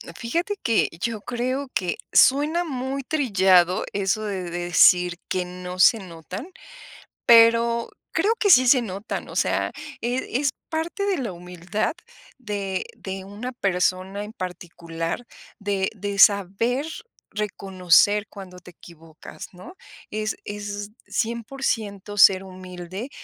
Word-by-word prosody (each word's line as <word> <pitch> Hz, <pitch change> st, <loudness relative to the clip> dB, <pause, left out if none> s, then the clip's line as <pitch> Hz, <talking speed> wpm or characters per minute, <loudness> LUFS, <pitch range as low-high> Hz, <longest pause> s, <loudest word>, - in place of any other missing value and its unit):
Fíjate 340 Hz, -, -2 dB
que, 230 Hz, -2 st, +2 dB
yo 225 Hz, -3 st, -2 dB
creo 255 Hz, +4 st, -3 dB
que, 180 Hz, -2 st, -1 dB, 0.2 s
suena 300 Hz, +6 st, +4 dB
muy 270 Hz, -2 st, -4 dB
trillado 190 Hz, -, +3 dB
eso 200 Hz, +2 st, 0 dB
de 190 Hz, -4 st, -4 dB
decir 175 Hz, 0 st, +4 dB
que 180 Hz, -1 st, -1 dB
no 180 Hz, 0 st, -8 dB
se 225 Hz, +5 st, +6 dB
notan, 185 Hz, -, -8 dB, 0.8 s
pero 235 Hz, 0 st, +5 dB, 0.2 s
creo 435 Hz, +3 st, +2 dB
que 405 Hz, -, +2 dB
sí 255 Hz, -6 st, +7 dB
se 255 Hz, -1 st, +6 dB
notan, 200 Hz, 0 st, -5 dB
o -, -, -10 dB
sea, -, -, 0 dB, 0.3 s
eh, 245 Hz, +2 st, -2 dB
es 285 Hz, -2 st, +1 dB, 0.2 s
parte 335 Hz, +5 st, -2 dB
de 395 Hz, -2 st, 0 dB
la 235 Hz, -7 st, -3 dB
humildad 180 Hz, -, -3 dB, 0.4 s
de 200 Hz, -5 st, -4 dB
de 190 Hz, 0 st, -7 dB
una 210 Hz, +6 st, -6 dB
persona, 190 Hz, -2 st, -1 dB
en 210 Hz, -, -8 dB
particular, 170 Hz, 0 st, -5 dB, 0.3 s
de 200 Hz, -2 st, -1 dB
de 200 Hz, 0 st, -4 dB
saber 205 Hz, -, +4 dB, 0.5 s
reconocer 200 Hz, 0 st, +2 dB
cuando 185 Hz, -3 st, -11 dB
te 180 Hz, -, -14 dB
equivocas, 165 Hz, -2 st, -13 dB
¿no? 290 Hz, -, -12 dB, 0.4 s
Es 215 Hz, 0 st, -2 dB
es 205 Hz, 0 st, -6 dB, 0.2 s
cien 235 Hz, 0 st, -2 dB
por 270 Hz, +2 st, -10 dB
ciento 205 Hz, -2 st, -3 dB
ser 190 Hz, -1 st, +7 dB
humilde, 185 Hz, +4 st, -8 dB
205 Hz, 130 wpm, -24 LUFS, 185-240 Hz, 0.8 s, sí